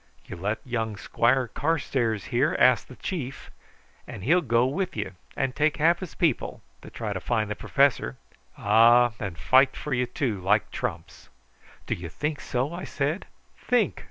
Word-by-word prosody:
You - - -8
let 100 +5 -3
young 110 -4 -2
Squire 120 +6 +1
Carstairs 130 - -1
here 130 +5 +2
ask 125 -1 +4
the 130 - -12
chief, 135 -7 -5 0.6
and 95 - -8
he'll 170 - +4
go 120 -4 +2
with 170 +5 -2
you, 105 -3 -3 0.3
and 135 -2 -1
take 155 +1 +1
half 165 +3 +3
his 185 -4 -8
people, 160 -8 -1 0.2
to - - -11
try - - -5
and - - -4
find 110 -3 -1
the - - -2
professor; 135 - +1 0.4
ah, 115 +3 +5
and 95 -5 -5
fight 130 - +4
for 150 - -4
you 125 0 +1
too, 115 -6 -2
like 105 +3 +2
trumps." - - -5 0.6
"Do - - -1
you 85 -1 -6
think 150 - -3
so?" 130 +6 -2
I 180 +1 -6
said. 150 +6 -2 0.3
"Think! 245 -5 0
125 Hz, 170 wpm, -26 LUFS, 110-150 Hz, 0.6 s, ah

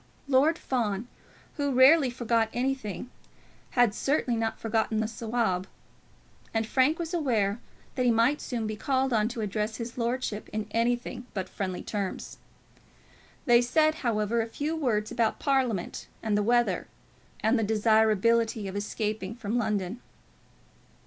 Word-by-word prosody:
Lord 285 +5 +4
Fawn, 230 - -2 0.5
who 285 -2 0
rarely 265 +2 +6
forgot 235 -2 0
anything, 250 -2 -2 0.7
had 240 -4 +5
certainly 265 -1 0
not 225 0 -2
forgotten 220 -1 0
the 220 - 0
Sawab; 220 -5 -1 0.9
and 225 0 +1
Frank 265 +7 +2
was 335 0 -4
aware 230 - +1 0.3
that 255 - -1
he - - +5
might 235 +6 +3
soon 235 -3 -3
be 215 0 -3
called 265 +3 0
on 215 -1 +3
to 235 -1 -4
address 215 +1 -2
his 235 +1 -6
lordship 235 -3 -2
in 215 0 -3
anything 240 +2 -1
but 190 -2 -2
friendly 185 -1 -4
terms. 200 -3 -4 1.1
They 240 -3 +6
said, 310 +6 +3
however, 230 -1 +1
a 225 - -3
few 295 +7 -3
words 230 -9 0
about 235 -2 +1
Parliament 255 - -1 0.2
and 215 -2 +1
the 210 - +2
weather, 240 +3 +1 0.5
and 225 +3 +3
the - - +1
desirability 220 0 +2
of 190 - -6
escaping 210 0 -3
from 235 0 -2
London. 210 0 -2
230 Hz, 140 wpm, -28 LUFS, 215-255 Hz, 1.1 s, rarely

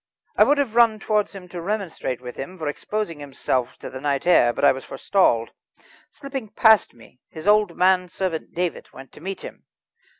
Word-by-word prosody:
I - - +6
would 290 - +3
have 275 -6 0
run 230 -2 +5
towards 210 -2 0
him 185 -2 -10
to 175 -1 -6
remonstrate 180 - -3
with 125 -1 -8
him 180 +7 -7
for 155 -3 -4
exposing 170 +2 -3
himself 130 -3 -2
to - - -8
the 130 0 -8
night 140 -2 -1
air, 150 -9 +5
but 130 - 0
I - - +7
was 130 0 -5
forestalled. 115 - +1 0.6
Slipping 275 -6 -7
past 220 - +4
me, 120 +2 -19
his 160 +1 -10
old 210 -3 +3
manservant, 180 -2 0
David, 175 -1 -3
went 135 0 -12
to - - -15
meet 195 +3 -5
him. - - -10
180 Hz, 190 wpm, -23 LUFS, 140-210 Hz, 0.6 s, I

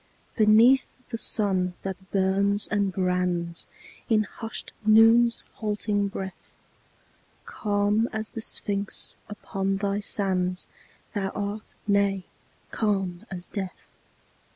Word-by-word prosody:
Beneath 225 +5 +5
the 230 - -3
sun 185 -5 0
that 190 0 -6
burns 200 +1 +2
and 200 -2 +1
brands 180 -2 -1 0.4
In 215 -2 +4
hushed 225 +2 -6
Noon's 225 +2 +6
halting 210 -1 0
breath, 190 -2 -7 0.9
Calm 205 +2 +1
as 220 0 -3
the 225 - -6
Sphinx 200 -2 -2
upon 195 -2 -2
thy 200 0 0
sands 185 -3 -1 0.5
Thou 195 -3 -1
art 205 +1 -4
nay, 200 -2 +2 0.5
calm 195 -5 -1
as 180 -2 -6
death. 190 -3 -6
200 Hz, 105 wpm, -26 LUFS, 190-215 Hz, 0.9 s, Noon's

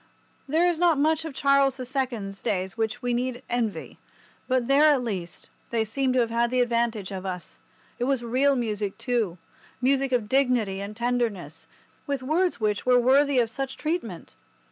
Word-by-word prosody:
There 320 +5 +2
is 350 -2 +1
not 345 -4 +4
much 315 +2 +1
of 310 -4 -6
Charles 275 -1 +3
the 255 -2 -6
Second's 240 -7 -3
days 190 0 -2
which 220 0 -2
we 245 0 0
need 250 +1 -2
envy, 235 -4 -3 0.5
but 255 -2 +1
there, 280 +2 +5
at 270 -4 +1
least, 185 -7 -5 0.2
they 225 -2 0
seem 260 +4 -1
to 255 - +2
have 230 -1 -1
had 235 +1 +1
the 255 +1 0
advantage 235 -4 0
of 190 -1 -5
us. 180 -2 -6 0.4
It 245 - 0
was 265 -2 0
real 265 +4 +2
music, 210 -5 -2
too—music 250 +5 -2
of 240 -4 +1
dignity 245 -7 +1
and 205 +2 -7
tenderness—with 240 - -4
words 340 +5 +1
which 210 -2 0
were 250 -1 +4
worthy 275 +3 +4
of 230 -2 +2
such 270 +3 -4
treatment. 295 - -4
245 Hz, 170 wpm, -26 LUFS, 220-275 Hz, 0.5 s, there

